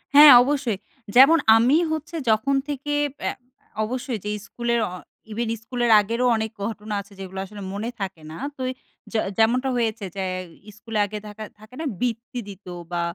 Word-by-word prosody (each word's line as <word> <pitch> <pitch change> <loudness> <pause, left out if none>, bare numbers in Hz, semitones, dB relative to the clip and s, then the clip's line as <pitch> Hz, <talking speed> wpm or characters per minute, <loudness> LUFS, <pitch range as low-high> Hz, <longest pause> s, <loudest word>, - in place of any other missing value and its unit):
হ্যাঁ 295 0 +11
অবশ্যই। 265 -6 0 0.4
যেমন 275 +6 +8 0.2
আমি 250 +6 +4
হচ্ছে 315 +2 -4
যখন 225 +6 +2
থেকে 290 0 -3 0.3
এ্যা - - 0 0.5
অবশ্যই 245 +1 -3
যেই 210 0 -2
স্কুলের 235 0 -1 0.5
ইভেন 225 +1 -2
স্কুলের 240 0 0
আগেরও 230 +4 -1
অনেক 220 0 -2
ঘটনা 210 -1 -5
আছে 200 0 -17
যেগুলো 190 0 -6
আসলে 205 +1 -10
মনে 210 +4 -3
থাকে 190 -4 -4
না। 160 - -8 0.2
তো 260 - -7 0.5
যে 225 - +1 0.2
যেমনটা 245 +4 +3
হয়েছে 225 -3 -1
যে 195 - -2 0.5
স্কুলে 220 0 -3
আগে 210 +1 -6
থাকা 210 +1 -8 0.2
থাকে 215 +4 -15
না - - -3 0.2
বৃত্তি 240 0 -2
দিত 200 -1 -11 0.3
বা 175 0 -1
225 Hz, 160 wpm, -24 LUFS, 210-255 Hz, 0.5 s, হ্যাঁ